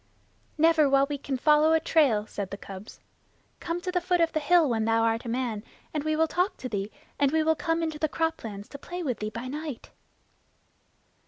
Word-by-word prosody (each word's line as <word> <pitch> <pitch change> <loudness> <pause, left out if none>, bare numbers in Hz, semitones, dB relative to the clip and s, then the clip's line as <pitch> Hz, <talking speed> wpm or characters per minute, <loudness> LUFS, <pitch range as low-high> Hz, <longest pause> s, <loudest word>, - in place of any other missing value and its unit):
"Never 315 -2 +4
while 275 0 +4
we 290 -1 -4
can 270 -1 -3
follow 300 +3 +4
a 320 - +4
trail," 285 -10 +3
said 200 -3 -5
the 200 - -6
cubs. 195 +1 -10 0.6
"Come 335 +1 -3
to 365 - -3
the 360 -1 0
foot 355 0 +1
of 330 -1 +3
the 310 - +1
hill 330 +1 +4
when 225 -3 0
thou 225 0 +2
art 230 +1 0
a - - -4
man, 235 -3 -2 0.3
and 300 -2 -1
we 310 0 0
will 320 +1 +3
talk 360 +5 0
to 255 - -5
thee; 205 -2 -3 0.3
and 280 -1 +3
we 320 0 +2
will 320 +1 +3
come 330 +1 -1
into 315 -2 -3
the 310 - 0
croplands 230 -12 -3
to 280 - -9
play 355 +4 -6
with 255 -7 -2
thee 215 - -3
by 230 +4 -6
night." 295 -1 -6
295 Hz, 220 wpm, -27 LUFS, 230-320 Hz, 0.6 s, Never